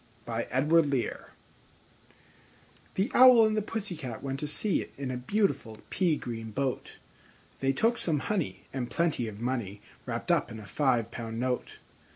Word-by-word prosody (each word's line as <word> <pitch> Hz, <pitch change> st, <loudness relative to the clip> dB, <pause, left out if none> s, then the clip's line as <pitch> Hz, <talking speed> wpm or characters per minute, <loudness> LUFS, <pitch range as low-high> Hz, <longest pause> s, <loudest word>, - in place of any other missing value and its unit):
I. -, -, -1 dB
The 145 Hz, -1 st, +2 dB, 1.9 s
Owl 250 Hz, -3 st, +9 dB
and 215 Hz, 0 st, +1 dB
the 215 Hz, -, +2 dB
Pussy 205 Hz, -3 st, -4 dB
Cat 130 Hz, -8 st, -6 dB
went 135 Hz, 0 st, -3 dB
to 150 Hz, -, -3 dB
sea 195 Hz, +7 st, 0 dB
In 135 Hz, -2 st, -3 dB
a 125 Hz, -, -3 dB
beautiful 135 Hz, -, 0 dB
pea 170 Hz, -5 st, +2 dB
green 115 Hz, -2 st, -5 dB
boat: 130 Hz, +3 st, -2 dB, 0.7 s
They 135 Hz, 0 st, +2 dB
took 225 Hz, -, +2 dB
some 160 Hz, -3 st, +1 dB
honey, 200 Hz, -7 st, -2 dB
and 125 Hz, -2 st, -3 dB
plenty 155 Hz, -3 st, 0 dB
of 105 Hz, -1 st, -7 dB
money 115 Hz, -5 st, -2 dB, 0.3 s
Wrapped -, -, -2 dB
up -, -, +2 dB
in 110 Hz, -, -7 dB
a 105 Hz, -, -10 dB
five 120 Hz, +1 st, +1 dB
pound 115 Hz, -1 st, -5 dB
note. 125 Hz, 0 st, -2 dB
135 Hz, 155 wpm, -29 LUFS, 120-170 Hz, 1.9 s, Owl